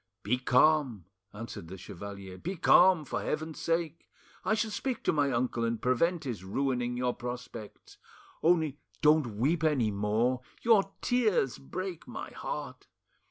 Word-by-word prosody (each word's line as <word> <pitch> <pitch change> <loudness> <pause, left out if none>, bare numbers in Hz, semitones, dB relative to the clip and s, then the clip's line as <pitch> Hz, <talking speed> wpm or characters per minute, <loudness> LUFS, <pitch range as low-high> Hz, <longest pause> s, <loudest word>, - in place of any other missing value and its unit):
"Be 125 +5 +1
calm," 130 - +3 0.3
answered 105 -6 -8
the 95 +3 -8
chevalier, 95 +1 -8
"be 185 +4 -4
calm, 180 -1 +5
for - - -3
heaven's 155 +1 -3
sake. 165 -1 -2 0.3
I 215 - +2
shall 220 0 -1
speak 250 +3 -3
to - - +2
my 145 -3 +2
uncle 120 -1 0
and 115 -1 -1
prevent 165 +7 +1
his 120 -9 -5
ruining 125 +3 -1
your 125 0 0
prospects. 120 -3 -8 0.4
Only 160 -4 +2 0.2
don't 150 -8 +4
weep 155 +8 +1
any 135 -9 +2
more, 110 +5 +1 0.2
your 210 -4 +4
tears 215 - +2
break 185 +4 -6
my - - -7
heart. - - -6
135 Hz, 145 wpm, -30 LUFS, 115-165 Hz, 0.4 s, calm